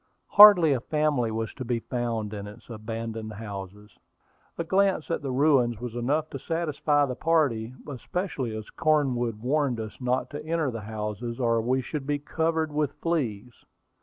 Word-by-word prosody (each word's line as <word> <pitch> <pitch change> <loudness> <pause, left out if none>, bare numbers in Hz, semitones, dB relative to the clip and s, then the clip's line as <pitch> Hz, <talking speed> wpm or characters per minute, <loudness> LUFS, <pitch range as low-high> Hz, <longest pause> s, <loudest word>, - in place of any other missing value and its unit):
Hardly 200 -7 +9
a 130 - 0
family 150 -3 0
was 110 0 -3
to 130 - -6
be 120 -1 -1
found 115 -3 -3
in 100 -1 -6
its 105 +3 -12
abandoned 110 0 -5
houses. 105 -1 -9 0.6
A 170 - -1
glance 190 -1 +1
at - - -1
the 140 - -4
ruins 130 -4 +3
was 120 -1 -6
enough 145 +6 0
to 135 - -5
satisfy 150 -2 +1
the 130 - -3
party, 130 -6 +1
especially 140 - -4
as 110 - -9
Cornwood 130 -8 +1
warned 135 -2 +1
us 110 +3 -7
not 125 0 -1
to 145 +1 -6
enter 160 -3 -1
the 115 -2 -6
houses, 110 +2 -5
or 115 -2 +2
we 130 +3 0
should 145 -1 -5
be 145 0 +1
covered 160 +2 -1
with 150 -2 0
fleas. 125 -9 -2
125 Hz, 165 wpm, -27 LUFS, 115-150 Hz, 0.6 s, Hardly